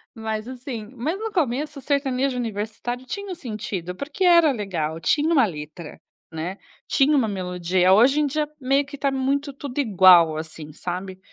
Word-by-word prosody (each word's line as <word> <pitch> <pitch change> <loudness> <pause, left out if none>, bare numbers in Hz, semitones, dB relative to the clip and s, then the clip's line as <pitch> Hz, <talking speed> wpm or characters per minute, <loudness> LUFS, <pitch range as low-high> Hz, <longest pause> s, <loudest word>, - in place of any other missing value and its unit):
Mas 220 -1 -4
assim, 250 -3 -6
mas 300 +10 -2
no 445 +1 -4
começo 295 - -1
sertanejo 270 -1 0
universitário 225 +2 -4
tinha 400 +9 -6
um - - -2
sentido, 210 - -5
porque 310 - -4
era 340 -4 +6
legal, 170 - -3
tinha 295 - +1
uma 320 -5 +4
letra, 155 -3 -6 0.3
né, 170 +4 -5 0.3
tinha 290 +1 +3
uma 245 -5 +2
melodia, 180 -2 +1
hoje 245 +9 +5
em 300 - +2
dia 300 +2 -1
meio 275 +2 +2
que 285 +1 -9
tá 280 0 0
muito 275 +2 -1
tudo 275 0 -6
igual 185 - +6
assim, 155 -1 -7
sabe. 185 +4 -6
245 Hz, 165 wpm, -23 LUFS, 185-280 Hz, 0.3 s, era